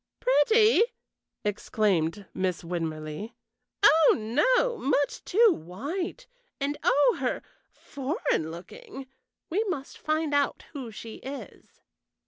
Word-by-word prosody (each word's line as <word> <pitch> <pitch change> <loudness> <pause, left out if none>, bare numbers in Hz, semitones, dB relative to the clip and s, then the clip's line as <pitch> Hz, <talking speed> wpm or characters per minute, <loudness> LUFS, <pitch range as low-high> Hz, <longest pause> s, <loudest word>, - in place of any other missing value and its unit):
"Pretty!" 440 -1 +4 0.6
exclaimed 205 -3 0
Miss 185 -2 -2
Winmarleigh. 165 +4 -4 0.5
"Oh 320 -1 +7
no! 485 - +2
Much 285 +1 0
too 440 +1 +5
white, 305 - -5 0.3
and, 285 +1 -1
oh 290 - +3
er - - -1 0.3
foreign 275 - -2
looking. 270 - -9 0.5
We 405 +6 +2
must 300 -9 -5
find 310 -1 -1
out 285 -1 +1
who 265 -6 -6
she 225 +1 -9
is." 275 +1 -10
280 Hz, 105 wpm, -27 LUFS, -, 0.6 s, Oh